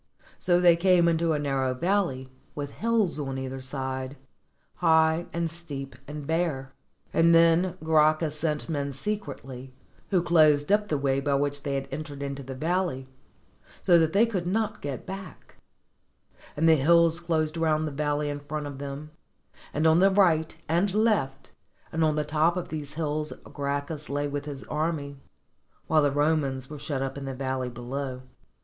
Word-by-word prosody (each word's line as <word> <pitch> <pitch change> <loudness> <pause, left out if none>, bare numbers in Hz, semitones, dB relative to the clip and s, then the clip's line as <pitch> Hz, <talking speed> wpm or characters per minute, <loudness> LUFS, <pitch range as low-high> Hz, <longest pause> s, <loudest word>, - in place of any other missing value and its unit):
So 175 -1 +3
they 175 -1 +6
came 175 0 +4
into 165 -1 +2
a - - +1
narrow 135 -3 0
valley, 170 -5 0 0.3
with 145 -1 -4
hills 220 -8 0
on 135 -2 -3
either 130 0 -5
side, 130 0 -4 0.6
high 160 +1 +3
and 170 0 -1
steep 150 -5 -8
and 145 0 -7
bare; 155 -5 -1 0.4
and 165 0 +5
then 170 +2 +4
Gracchus 155 -1 +2
307 160 +1 +1
ROME 150 -1 -1
sent - - -8
men 140 -2 -2
secretly, 135 -6 -5 0.4
who 185 -4 +2
closed 155 -2 +4
up 210 0 +3
the 155 - 0
way 135 -1 +1
by 140 0 0
which 145 0 -1
they 140 -1 -2
had 135 0 -3
entered 145 0 -6
into 140 0 -4
the 135 0 -7
valley, 160 -3 -1 0.7
so 175 -2 +6
that 160 -1 +2
they 205 +5 +4
could 190 -7 -3
not 215 +3 -1
get 140 -3 -5
back; 195 0 -9 1.0
and 160 +2 +3
the 160 -1 +6
hills 170 +3 +4
closed 160 -2 -1
round 155 -1 +1
the - - -4
valley 145 +1 -1
in 145 0 -3
front 150 +1 -5
of 140 -2 -7
them, 140 +2 -6 0.6
and 155 +2 -1
on 160 +1 +5
the 195 +2 +6
right 170 -5 +2
and 180 +5 +1
left, 210 -12 +1 0.4
and 165 0 0
on 155 -1 +2
the 150 0 0
top 160 +4 +2
of 180 - -4
these 150 -1 -4
hills 155 -1 -2
Gracchus 145 +2 -4
lay 145 +1 -1
with 145 0 -4
his 140 -3 -7
army, 150 -2 -3 0.7
while 155 -1 +3
the 145 - +3
Romans 145 -2 0
were 150 - -7
shut 140 -2 -2
up 135 +1 -4
in 135 - -7
the 135 -1 -4
valley 130 -1 -2
below. 130 +2 -5
150 Hz, 175 wpm, -27 LUFS, 140-170 Hz, 1.0 s, they